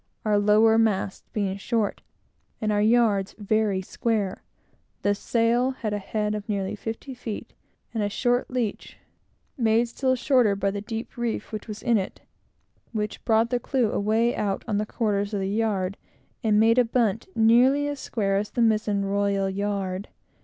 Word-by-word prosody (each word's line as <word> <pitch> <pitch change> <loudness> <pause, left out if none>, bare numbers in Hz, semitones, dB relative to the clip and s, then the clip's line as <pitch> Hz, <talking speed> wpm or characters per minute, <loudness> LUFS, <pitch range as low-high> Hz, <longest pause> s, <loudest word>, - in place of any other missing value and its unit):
Our 210 -1 +3
lower 215 +2 +5
masts 205 -3 0
being 195 -2 -1
short, 220 +1 -1 0.6
and 215 -1 0
our 205 0 +2
yards 215 -3 +3
very 210 -2 0
square, 210 -1 -1 0.6
the 205 - +3
sail 235 +4 +1
had 230 -5 -3
a 205 - -1
head 210 +1 -2
of 210 0 -5
nearly 200 0 -1
fifty 225 +5 -6
feet, 235 -4 -7 0.4
and 225 - -1
a 205 - 0
short 245 +4 0
leach, 245 -5 -3 0.6
made 230 0 +3
still 260 +2 +1
shorter 250 -5 +3
by 200 0 0
the 200 0 -4
deep 225 +3 -6
reef 235 -1 -3
which 215 0 -6
was 215 -1 -7
in 235 -3 +3
it, 190 - -6 0.7
which 210 -1 -3
brought 225 0 +3
the 245 - +1
clew 245 -2 0
away 220 +4 +1
out 195 -2 -2
on 210 -2 0
the 210 - -2
quarters 205 -2 -1
of - - -1
the 190 - -1
yard, 200 -2 -1 0.5
and 210 -2 +3
made 225 +3 +5
a - - +6
bunt 225 -2 0
nearly 250 +6 +4
as 290 -1 -4
square 200 -6 -1
as 210 +1 -2
the 240 - -2
mizen 215 -2 +1
royal 200 -1 0
yard. 195 -1 -2
215 Hz, 170 wpm, -25 LUFS, 200-230 Hz, 0.7 s, a